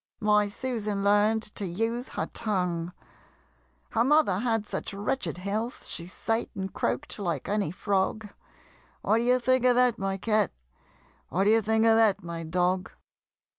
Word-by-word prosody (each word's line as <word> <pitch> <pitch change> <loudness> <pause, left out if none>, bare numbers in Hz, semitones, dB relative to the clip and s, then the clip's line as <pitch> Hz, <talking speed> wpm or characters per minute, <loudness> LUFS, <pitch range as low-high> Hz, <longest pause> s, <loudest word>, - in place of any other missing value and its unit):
My 210 -1 +3
Susan 210 -3 -3
learn'd 210 +2 +3
to - - -4
use 225 +7 -2
her - - 0
tongue: 180 -6 -1 1.0
Her 230 - +2
mother 270 -9 +3
had 225 -2 0
such 205 - -5
wretched 210 +2 -2
health, 210 +6 -3
She 170 - -3
sate 225 +5 -2
and 190 -1 -4
croak'd - - -2
like 175 -4 -2
any 205 -4 0
frog 200 +4 -1 0.8
What 220 - +3
d'ye 250 +2 +3
think 255 0 +2
of 250 -1 +5
that, 250 -1 +3
my 195 0 -1
Cat? 210 -1 +1 0.8
What 185 +3 +1
d'ye 220 +3 +4
think 220 +1 +2
of 225 0 +5
that, 205 -3 +3
my 170 -1 -5
Dog? 180 +3 0
210 Hz, 150 wpm, -27 LUFS, 190-225 Hz, 1.0 s, of